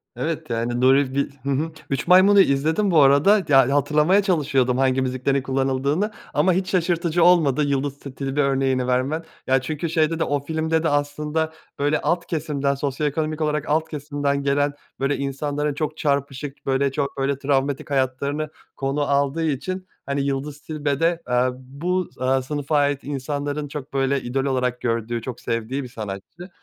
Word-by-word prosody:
Evet, 160 -3 -3
yani, 120 +1 -1
Nuri 135 +1 +4
Bil 140 0 0
hı 140 - -3
hı. 150 +4 0 0.2
"Üç 135 +2 -2
Maymun"u 190 +3 +7
izledim, 160 +5 +3
bu 160 -3 +6
arada. 145 +10 +5
Ya, 135 -1 +5
hatırlamaya 150 +7 +3
çalışıyordum 140 -9 +1
hangi 130 0 +2
müziklerin 130 +1 0
kullanıldığını 135 +8 0 0.2
ama 170 +5 +3
hiç 185 +1 -1
şaşırtıcı 170 -2 +1
olmadı 155 -5 +4
Yıldız 140 0 -1
Ti 140 -2 -10
Tilbe 135 +1 -1
örneğini 135 -2 +1
vermen. 130 +6 0 0.2
Ya 130 0 +3
çünkü 155 +5 -3
şeyde 160 0 +1
de, - - +2
o 145 0 0
filmde 160 +2 -1
de 165 - +2
aslında 150 +2 -1 0.3
öyle 145 +2 +1
alt 170 0 0
kesimden, 145 -3 -1
sosyoekonomik 150 +3 -2
olarak 150 -1 -1
alt 160 +2 +1
kesimden 145 -1 -2
gelen 145 +1 +1 0.3
böyle 140 +1 0
insanların 145 +2 -2
çok 155 +1 -3
çarpışık, 140 -1 -2
böyle, 135 0 +1
çok 140 0 -3
böyle 135 0 0
travmatik 140 0 -1
hayatlarını 140 +3 -1 0.3
konu 135 +2 -1
aldığı 140 +2 +1
için, 185 +6 -3 0.2
hani, 140 0 -1
Yıldız 140 +1 -3
Tilbe 145 -3 -2
de, 165 +1 +1
eee, 125 +1 +3
bu, 165 +8 -3
eee, 130 +1 +2
sınıfa 145 +2 -1
ait 145 -1 +1
insanların 145 +1 -3
çok 145 -1 -8
böyle 135 0 +1
idol 135 +3 -2
olarak 125 -2 -1
gördüğü, 115 0 -1
çok 125 +1 -6
sevdiği 115 +4 -2
bir 125 - -8
sanatçı. 110 - -8
140 Hz, 165 wpm, -23 LUFS, 135-155 Hz, 0.3 s, Maymun"u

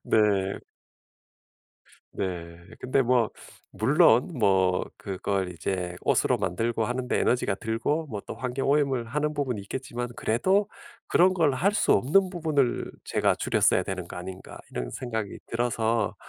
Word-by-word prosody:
네. 100 -3 +2 1.5
네. 85 -3 -4 0.2
근데 130 +2 +1
뭐 120 -3 +2 0.4
물론 125 - +4
뭐 95 -4 +3
그걸 95 -1 -2
이제 90 0 -3
옷으로 - - +2
만들고 115 +5 -1
하는 125 +2 -3
데 - - +1
에너지가 120 -5 +1
들고 115 +10 -1
뭐 105 -7 -5
또 - - -5
환경 130 +2 -2
오염을 140 -4 +2
하는 150 +4 -1
부분이 135 -7 -2
있겠지만 120 +2 -5
그래도 190 - +1 0.4
'그런 185 +2 +4
걸 160 -6 +2
할 185 +10 +2
수 215 - +2
없는 185 +8 +3
부분을 155 -8 0
제가 - - +1
줄였어야 - - +2
되는 95 -2 -5
거 - - -9
아닌가.' 95 +1 -8
이런 60 -1 -4
생각이 110 - -4
들어서 115 -1 0
120 Hz, 280 characters per minute, -27 LUFS, 100-140 Hz, 1.5 s, 물론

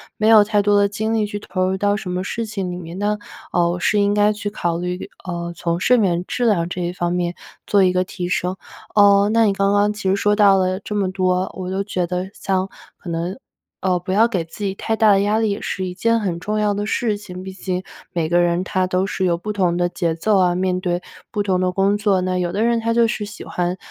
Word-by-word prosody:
没 215 +1 +2
有 215 -2 +8
太 210 -1 +2
多 205 0 +3
的 200 - +4
精 220 +2 -2
力 220 -2 +1
去 205 0 -5
投 185 -2 -2
入 190 - 0
到 205 +1 +1
什 190 -3 -6
么 180 +1 -2
事 230 +3 -3
情 195 -4 -4
里 175 - -5
面， 175 0 -8
那， 210 +1 0 0.3
呃， 170 -1 +2
我 175 - -2
是 210 - +2
应 200 0 +2
该 210 0 +4
去 210 0 -4
考 175 -5 -2
虑， 180 +3 -4 0.2
呃， 170 -1 -4
从 170 0 -2
睡 250 +4 +4
眠 180 -5 +1
质 245 +4 -2
量 175 -6 +2
这 180 - -5
一 175 +1 -2
方 175 -1 -1
面 175 -1 -1 0.3
做 200 -2 +4
一 180 - +4
个 185 0 +1
提 180 -1 -5
升。 185 0 -1 0.4
呃， 200 0 +6
那 230 0 +4
你 210 - +4
刚 195 +1 +1
刚 205 +1 +3
其 210 -2 -3
实 195 - +3
说 205 +1 +1
到 200 -2 +6
了 185 0 0
这 210 +1 -6
么 190 -2 0
多， 185 -1 0
我 185 -1 -4
都 195 +1 -1
觉 180 -3 -2
得 180 +2 -3
像 190 0 -1 0.3
可 175 - -9
能， 170 +5 -3 0.4
呃， 185 -2 +1
不 185 +2 -5
要 220 +4 +4
给 190 -8 -1
自 165 +6 -9
己 195 -1 -1
太 220 +3 -2
大 220 -2 +5
的 195 - +5
压 210 +2 +1
力， 220 -2 +1
也 200 - -3
是 185 - -3
一 180 - -4
件 230 +4 +1
很 180 -5 -2
重 210 +4 -2
要 210 -1 +2
的 205 +1 -2
事 220 -2 0
情。 185 -3 -9
毕 190 - -7
竟 185 -1 -3 0.3
每 170 -3 0
个 175 - +3
人 175 +1 +2
他 185 0 0
都 185 +1 0
是 190 -1 -2
有 170 -2 +2
不 210 +4 -4
同 180 -4 +1
的 175 0 +2
节 170 -2 -1
奏 200 +5 +2
啊， 180 -1 +3
面 185 0 0
对 175 -1 -1 0.3
不 205 -2 -1
同 185 -2 +1
的 185 0 +1
工 195 +2 +2
作， 200 -3 +2
那 185 0 -1
有 175 -1 -1
的 210 - 0
人 235 0 +2
他 230 0 0
就 235 -1 +4
是 210 - -3
喜 210 - -9
欢， 180 +1 -2
190 Hz, 285 characters per minute, -20 LUFS, 180-205 Hz, 0.4 s, 有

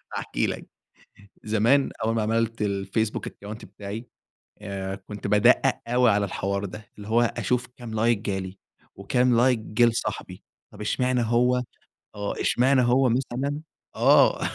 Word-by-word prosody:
هاحكي - - -1
لك - - -5 0.8
زمان 115 +6 +3
أول 115 +1 +1
ما 115 - 0
عملت 115 +1 0
الفيسبوك 100 +2 -1
Account 105 +3 -9
بتاعي، 100 +4 -8 0.5
آآ، 95 -2 -4
كنت 105 0 -8
بادقّق 120 +6 +4
أوي 125 0 +3
على 100 0 +2
الحوار 100 +1 -2
ده، 105 +2 -9
اللي 105 -1 -9
هو 115 +2 +3
أشوف 125 +1 0
كام 115 -3 -7
Like 115 -3 +3
جالي؟ 95 -2 -4 0.4
وكام 125 +5 +2
Like 125 -1 +4
جِه 110 +2 +2
لصاحبي؟ 115 -1 -3 0.3
طب - - -11
إشمعنى 125 +3 0
هو 125 +2 +2 0.5
آه 100 -1 -4
إشمعنى 130 +1 +3
هو 125 +2 +3
مثلًا 135 +4 -1 0.4
آه - - +5
115 Hz, 140 wpm, -25 LUFS, 105-125 Hz, 0.8 s, آه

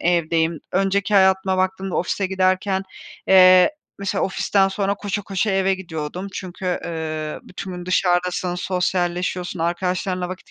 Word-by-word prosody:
evdeyim. 165 -1 +1
Önceki 195 +2 +1
hayatıma 190 -1 +4
baktığımda 190 0 -1
ofise 190 +2 -1
giderken, 190 +1 +1 0.5
eee, 185 +3 +7 0.3
mesela 200 -1 -1
ofisten 195 0 +1
sonra 200 0 -1
koşa 205 0 -4
koşa 195 +2 -1
eve 195 0 +2
gidiyordum. 175 0 -6
Çünkü, 185 -1 -4
ııı, 155 -2 -4
bütün 185 0 -8
gün 180 0 -7
dışarıdasın, 180 -1 +1
sosyalleşiyorsun, 180 -1 -1
arkadaşlarınla 180 +1 -1
vakit 185 0 -9
185 Hz, 125 wpm, -21 LUFS, 175-190 Hz, 0.5 s, eee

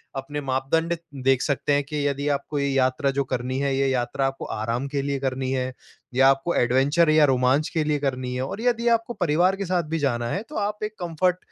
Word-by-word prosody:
अपने 145 +2 -4
मापदंड 145 +6 0 0.3
देख 135 -1 +3
सकते 145 0 0
हैं 145 0 +2
कि 145 0 -2
यदि 140 +1 -2
आपको 145 +1 -2
ये 140 - 0
यात्रा 135 +1 +1
जो 140 0 0
करनी 130 +1 -2
है, 140 -1 0
ये 135 0 +2
यात्रा 130 +1 0
आपको 135 0 -5
आराम 115 +5 -2
के 140 0 -2
लिए 140 -1 -1
करनी 130 -1 -2
है 130 -1 -1 0.4
या 135 +1 +6
आपको 135 +5 +1
एडवेंचर 135 +7 +3
या 155 -1 +6
रोमांच 130 +2 +2
के 160 -3 0
लिए 150 -1 0
करनी 130 -2 -2
है। 125 - -2
और 205 +11 -5
यदि 240 -1 +1
आपको 230 +1 -4
परिवार 175 +1 +2
के 200 - -3
साथ 180 -1 0
भी 165 - +1
जाना 120 -4 0
है, 190 - -2
तो - - -9
आप 210 +1 -2
एक 215 0 -4
कम्फ़र्ट 175 +1 0
140 Hz, 225 wpm, -24 LUFS, 130-165 Hz, 0.4 s, या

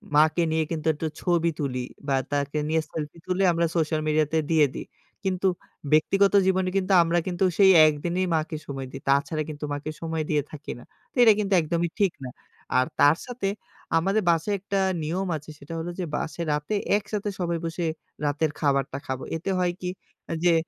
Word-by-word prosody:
মাকে 155 +3 +4
নিয়ে 160 0 +2
কিন্তু 160 -1 -3
একটু 155 +2 -3
ছবি 170 -2 +2
তুলি 130 -4 -2 0.2
বা 140 - +2 0.2
তাকে 145 +1 -1
নিয়ে 160 0 +2
selfie 155 +1 -5
তুলে 185 +1 +1
আমরা 170 0 +1
social 155 -1 +1
media 155 0 +3
তে 160 - +4
দিয়ে 155 -2 +5
দেই - - -5 0.4
কিন্তু 190 -1 0 0.4
ব্যক্তিগত 195 +6 +4
জীবনে 190 -1 +2
কিন্তু 195 0 +1
আমরা 170 +1 +1
কিন্তু 180 0 -1
সেই 195 -1 +7 0.2
একদিনেই 170 +5 0
মাকে 155 0 -1
সময় 135 -2 -5
দেই। 135 - -8
তাছাড়া 140 +3 +2
কিন্তু 150 0 -5
মাকে 145 +2 -4
সময় 160 -1 -2
দিয়ে 150 -1 +2
থাকি 145 -1 -7
না। - - -13 0.3
তো - - -40
এটা 225 -2 +8
কিন্তু 200 -1 0
একদমই 170 +2 -1
ঠিক 195 -4 +3
না। 130 - -5 0.5
আর 130 - +4
তার 145 +3 +6
সাথে 245 -5 -3 0.5
আমাদের 195 +6 +2
বাসায় 170 +5 +2
একটা 200 +1 -2 0.2
নিয়ম 180 +5 -2
আছে 150 +1 -13
সেটা 140 +4 -9
হলো 165 +2 -4
যে 180 - -1
বাসে 165 - -3
রাতে 150 +7 -1 0.2
একসাথে 210 0 -3
সবাই 170 -2 0
বসে 165 +1 -2 0.4
রাতের 145 +2 +1
খাবারটা 140 -2 +1
খাবো। 130 0 -4
এতে 165 - -5
হয় 180 -1 +2
কি 180 - -2 0.4
আ - - 0
যে, 175 -1 +5
165 Hz, 190 wpm, -25 LUFS, 150-185 Hz, 0.5 s, এটা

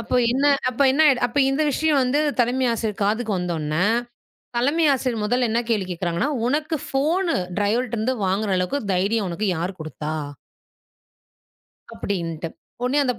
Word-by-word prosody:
அப்ப 230 - -4 0.2
என்ன 270 +3 0 0.2
அப்ப 255 +2 0
என்ன 285 - +1
ஆய்டு 260 -3 +3
அப்ப 245 +4 -3
இந்த 275 +3 +1
விஷியம் 305 +1 +2
வந்து 265 +4 +1 0.2
தலைமை 250 +2 +2
ஆசிரியர் 220 -2 -2
காதுக்கு 220 +2 0
வந்தவுனே, 165 -1 -1 0.7
தலைமை 290 +7 +2
ஆசிரியர் 250 -4 -1
முதல்ல 245 +2 +1
என்ன 230 +2 +1
கேள்வி 210 -5 0
கேக்குறாங்கன்னா, 175 - -1 0.2
"உனக்கு 305 +4 0
ஃபோனு, 325 +7 +1 0.2
டிரைவர்ட்ட 230 +4 0
இருந்து 240 +4 0
வாங்குற 195 +2 0
அளவுக்கு 270 +11 -1
தைரியம் 200 +3 +1
உனக்கு 200 +4 -2
யாரு 180 +3 -3
குடுத்தா?" 155 0 -5 1.8
கப்டின்னுட்டு. 165 -4 -4 0.4
உனே 270 +4 +1
அந்தப் 250 -4 -1
230 Hz, 145 wpm, -23 LUFS, 190-270 Hz, 1.8 s, ஆய்டு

